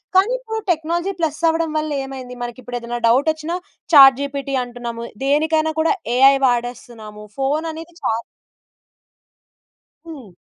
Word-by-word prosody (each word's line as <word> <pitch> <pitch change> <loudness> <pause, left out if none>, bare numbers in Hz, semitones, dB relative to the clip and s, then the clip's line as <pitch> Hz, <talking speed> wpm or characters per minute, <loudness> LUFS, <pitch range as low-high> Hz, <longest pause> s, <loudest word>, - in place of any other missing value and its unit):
కానీ 390 +6 +4
ఇప్పుడు 445 -3 -5
technology 340 +3 -1
plus 310 -2 -1
అవ్వడం 325 0 +1
వల్ల 305 0 -2
ఏమైంది? 260 -2 -8
మనకి 240 +1 -6
ఇప్పుడు 245 -1 -5
ఏదైనా 240 0 -5
డౌట్ 260 +7 +3
వచ్చినా 315 +2 -5 0.4
చాట్ 270 -3 +9
జిపిటి 280 -1 -3
అంటున్నాము. 240 -1 -7 0.2
దేనికైనా 315 +3 +2
కూడా 320 +4 +3 0.2
ఏఐ 270 +2 +7
వాడేస్తున్నాము. 235 -3 -3
ఫోన్ 285 +4 0
అనేది 325 +2 -10
చా - - 0 2.0
హ్మ్. 270 - -10
275 Hz, 130 wpm, -20 LUFS, 245-320 Hz, 2.0 s, చాట్